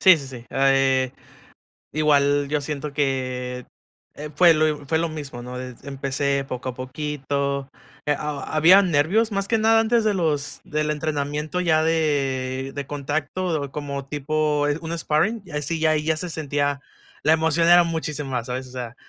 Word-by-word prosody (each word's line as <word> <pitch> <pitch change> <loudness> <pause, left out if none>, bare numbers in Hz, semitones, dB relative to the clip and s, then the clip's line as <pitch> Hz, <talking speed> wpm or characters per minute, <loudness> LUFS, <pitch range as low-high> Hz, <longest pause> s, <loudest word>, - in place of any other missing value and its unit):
Sí, 185 -2 +8
sí, 140 - -7
sí, 125 -3 -10
ah, 135 0 +2
eh, 135 -1 +2 0.8
igual, 145 -1 +3
yo 150 0 0
siento 145 0 -4
que, 130 -3 -2 0.5
eh, 150 0 -7
fue 170 0 +6
lo 155 -2 +1
fue 160 +2 +1
lo 165 0 0
mismo, 145 -5 -7
¿no?, 125 +1 -7
empecé 135 +2 -2
poco 130 -1 -4
a - - -11
poquito, 140 0 -3 0.4
ha - - +1
ha 145 -1 -4
había 180 +6 +7
nervios 185 +7 +2
más 195 -1 -1
que 225 0 +1
nada 225 +1 +4
antes 230 +1 +2
de 215 -1 +2
los 155 -6 -1
del 150 0 -1
entrenamiento 150 +2 -2
ya 160 -3 +3
de 135 -4 0
de 140 -1 -4
contacto 145 +2 -2
como 140 -2 -5
tipo, 150 +1 0
eh, 145 - 0
un 165 0 -4
sparring, 195 +9 0 0.2
sí 165 +3 -2
ya 160 0 +2
ahí 150 -1 0
ya 160 0 +1
se 180 +3 -4
sentía 145 -3 -1 0.4
la 155 - +4
emoción 160 +1 +2
era 175 0 +7
muchísimo 150 -4 -3
más, 120 -2 -2
¿sabes?, 130 +1 -4
o - - -14
sea 125 -1 -6
145 Hz, 175 wpm, -23 LUFS, 135-160 Hz, 0.8 s, Sí